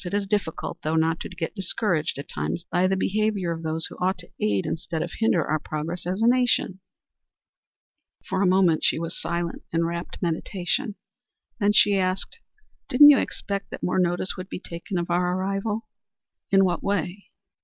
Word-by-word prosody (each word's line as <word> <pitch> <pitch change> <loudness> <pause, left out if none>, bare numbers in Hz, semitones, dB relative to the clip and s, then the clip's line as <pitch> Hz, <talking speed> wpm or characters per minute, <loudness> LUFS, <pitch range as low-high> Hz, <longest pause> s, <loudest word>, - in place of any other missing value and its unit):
"It 180 +2 -3
is 205 -1 0
difficult, 195 -5 -2
though, 155 +1 -1
not 160 +1 +2
to - - -6
get 175 -3 -4
discouraged 185 -6 0
at 140 - -6
times 75 +3 -3
by 180 +2 +3
the 190 - +1
behavior 205 -3 0
of 165 -1 -4
those 160 0 0
who - - -7
ought 185 +1 +1
to 175 - -10
aid 100 -2 +1
instead 165 0 -3
of - - -6
hinder 195 -8 +3
our 155 +1 0
progress 160 +4 -4
as 190 +5 -1
a - - +5
nation." 245 -6 +2 1.5
For 190 - 0
a 195 - +4
moment 180 -3 +3
she - - +3
was 165 +1 -4
silent 170 0 -2
in 165 0 +1
wrapt 170 +1 -4
meditation, 190 - -2 0.6
then 205 -1 +3
she 205 -1 +5
asked: 190 - -1 0.5
"Didn't 290 +3 +9
you 275 - +5
expect 200 0 -3
that - - -8
more 180 - +1
notice 175 +1 0
would 185 +1 -7
be - - -5
taken 175 +1 -5
of 175 0 -2
our 180 +1 +1
arrival?" 200 +3 -2 0.6
"In 195 -1 +5
what 175 -2 0
way?" 200 -1 -2
180 Hz, 185 wpm, -25 LUFS, 165-200 Hz, 1.5 s, Didn't